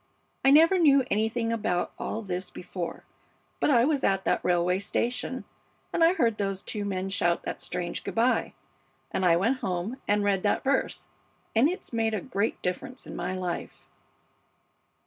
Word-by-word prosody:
I 270 - +6
never 330 +6 +6
knew 280 -5 +6
anything 225 +2 0
about 180 -6 -1
all 225 - -3
this 185 -1 -4
before, 175 -1 -6 0.6
but - - +2
I 240 -5 +5
was 290 -2 +1
at 195 -1 +1
that - - +1
railway 180 +1 +2
station, 245 +5 -2 0.5
and 335 - +3
I 330 +2 +6
heard 230 - +1
those 195 -1 -2
two 210 -1 -3
men 190 -1 -2
shout 175 -3 +1
that - - -5
strange 175 -1 -4
good - - -5
by, 235 +3 +2 0.6
and - - -1
I 170 -2 +5
went 230 +9 +1
home 185 +6 -3
and 205 0 +2
read 200 -2 +2
that 205 - +1
verse, 275 0 0 0.5
and 245 +7 +5
it's 365 -7 -6
made 225 -1 +1
a - - -1
great 225 -5 -1
difference 250 +9 -4
in - - -8
my 180 +2 -3
life.' 180 -2 -5
210 Hz, 170 wpm, -27 LUFS, 185-255 Hz, 0.6 s, I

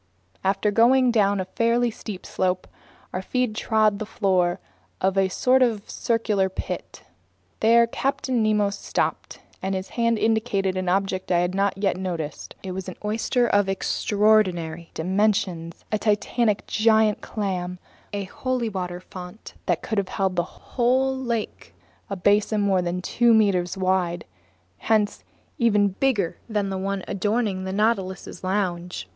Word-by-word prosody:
After 195 +2 +1
going 245 +3 +5
down 205 -3 +2
a 185 - -2
fairly 235 +4 +1
steep 210 -3 -8
slope, 185 -1 -1 0.5
our 185 - -2
feet 250 +3 -1
trod 215 -1 +2
the 215 - -3
floor 185 -5 +1 0.4
of 190 +1 +1
a 195 -1 +3
sort 255 +7 +3
of 225 -5 +1
circular 215 -4 0
pit. 190 - -6 0.6
There 235 +1 +5
Captain 255 0 -1
Nemo 210 -2 +2
stopped, - - -3 0.2
and 190 +1 -1
his 190 0 -4
hand 230 -1 +1
indicated 215 -4 +1
an 185 -1 -1
object 190 0 0
that 175 - +2
I - - +3
hadn't 190 +2 0
yet 195 -2 0
noticed. 170 -6 -5
It 190 - -4
was 185 0 -5
an 185 - -8
oyster 230 +3 +1
of 205 -3 +2
extraordinary 190 -5 +1
dimensions, 185 -2 0
a 215 - +1
titanic 210 +1 +1
giant 220 -1 +3
clam, 180 -4 -3 0.3
a 205 -1 -3
holy 250 +4 -2
water 180 -3 -4
font 180 +3 -10
that 175 -3 0
could 220 -2 0
have 190 -2 -3
held 190 -2 0
a - - +5
whole 255 +8 0
lake, 235 - -4 0.3
a 195 - -2
basin 205 +3 +2
more 195 -2 +2
than 180 +1 -3
two 235 +2 +4
meters 190 -4 +2
wide, 185 -2 0 0.5
hence 215 -2 +1 0.4
even 210 -4 +4
bigger 200 -4 0
than 205 -2 0
the 190 - -2
one 195 0 -2
adorning 205 -1 -1
the 190 - -3
Nautilus's 195 -3 -1
lounge. 180 - -2
200 Hz, 150 wpm, -24 LUFS, 185-220 Hz, 0.6 s, going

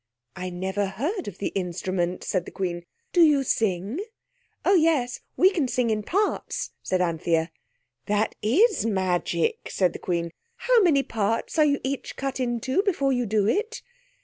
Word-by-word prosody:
"I 185 0 -4
never 190 +3 -2
heard 300 - -3
of 200 -3 -7
the 200 - -2
instrument," 180 -1 -2
said 180 -3 -1
the - - -9
Queen. 175 -3 -4 0.3
"Do 350 - +5
you 295 -4 +5
sing?" 210 - 0 0.7
"Oh, 390 - +5
yes. 315 -8 +2 0.2
We 375 +2 +6
can 325 -9 0
sing 245 -2 0
in 215 -1 0
parts," 400 - -1
said 185 -1 0
Anthea. 165 -1 0 0.6
"That 210 +1 +1
is 325 - +3
magic," 185 -5 0
said 180 -3 +1
the - - -7
Queen. 170 -2 -2 0.2
"How 475 -1 +3
many 305 -8 +4
parts 225 +7 -1
are 305 - +7
you 285 -1 +2
each 270 +1 -4
cut 270 -1 -3
into 255 - 0
before 300 -10 +1
you 245 -2 0
do 205 -1 +2
it?" 435 - -1
225 Hz, 165 wpm, -25 LUFS, 185-290 Hz, 0.7 s, are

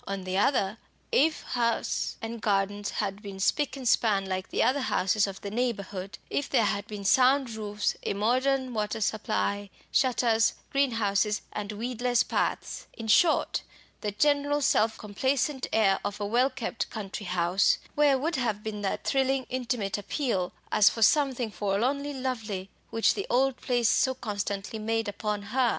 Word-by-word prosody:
On 195 -1 -3
the 185 0 -3
other, 210 -3 +1 0.3
if 310 +3 +2
house 235 -2 -1
and 225 0 -5
gardens 205 0 0
had 195 +1 -3
been 200 -2 -8
spick 280 +7 +1
and 260 -2 -4
span 205 -4 +3
like 185 0 -3
the - - +1
other 270 +3 +2
houses 200 -3 +1
of 195 0 -7
the 200 - -5
neighbourhood, 200 -5 -3
if 285 - -2
there 235 -5 +3
had 205 +1 -1
been 205 -2 -7
sound 260 +3 +4
roofs, 210 -1 -2
a - - -2
modern 255 +4 +1
water 210 0 -2
supply, 205 -1 -1 0.2
shutters, 235 -3 +3 0.2
greenhouses, 220 -6 +1
and 210 0 -4
weedless 245 +1 0
paths, - - -2
in 225 -2 -7
short, 315 +9 +3 0.4
the 210 - -2
general 285 +5 +2
self 220 -4 +2
complacent 260 +6 -1
air 195 -3 +3
of 205 +1 -4
a 205 - -2
well 240 +6 +3
kept 245 -3 -4
country 205 -1 -6
house, 180 +2 +2 0.2
where 290 -2 +4
would 310 +3 -1
have 220 -5 -1
been 210 -1 -4
that 195 - -2
thrilling 270 -1 +1
intimate 240 -6 -2
appeal, 200 -4 -1 0.2
as 210 -1 +6
for 225 - -1
something 260 -4 +3
forlornly 245 +9 -1
lovely, 225 -8 -4 0.2
which 225 - +3
the 400 - -4
old 265 +1 +2
place 240 -2 +1
so 260 +3 +3
constantly 205 -2 -4
made 225 +1 -1
upon 205 0 -3
her? 240 +4 +1
220 Hz, 160 wpm, -28 LUFS, 205-260 Hz, 0.4 s, as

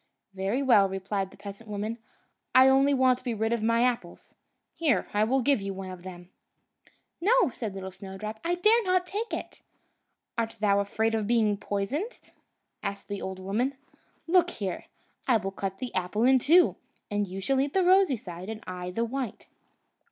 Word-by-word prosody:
"Very 195 +8 -1
well," 215 -7 +5
replied 195 0 -3
the - - -17
peasant 200 +2 -10
woman; 210 +3 -3 0.6
"I 260 +1 +8
only 270 +1 +4
want 255 -2 +3
to - - -21
be 240 -3 -2
rid 220 +2 0
of 235 - -1
my 230 +2 +3
apples. 235 -9 -2 0.4
Here, 285 - +1
I 205 +1 +3
will 255 +4 +2
give 275 -4 +3
you 195 0 -4
one 190 -1 -6
of 180 -1 -9
them!" 180 -1 -10 0.9
"No!" 430 - +4
said 210 -5 -5 0.2
Snowdrop, 195 +3 -7
"I 345 +1 +1
dare 430 +6 +4
not 365 -2 +2
take 420 +6 -4
it." - - -6 0.8
"Art 225 -1 -2
thou 200 -1 +3
afraid 220 +3 0
of 215 -2 0
being 220 -3 +3
poisoned?" 230 - -3 0.6
asked 200 0 -5
the 200 -1 -4
old 190 0 -5
woman. 220 +9 -1 0.5
"Look 355 +1 +4
here; 200 - -4 0.4
I 245 -3 +5
will 195 -2 -4
cut 195 0 -4
the 250 +2 -6
apple 185 +4 -1
in 260 +1 +6
two, 340 +8 +5 0.3
and 205 0 0
you 190 +1 -6
shall 265 +8 +1
eat 280 +1 -2
the 380 -2 +3
rosy 370 -7 +5
side, 180 -2 -8
and 220 -1 -6
I 180 -1 -5
the 230 +6 -1
white." 255 -1 -4
220 Hz, 180 wpm, -28 LUFS, 195-265 Hz, 0.9 s, I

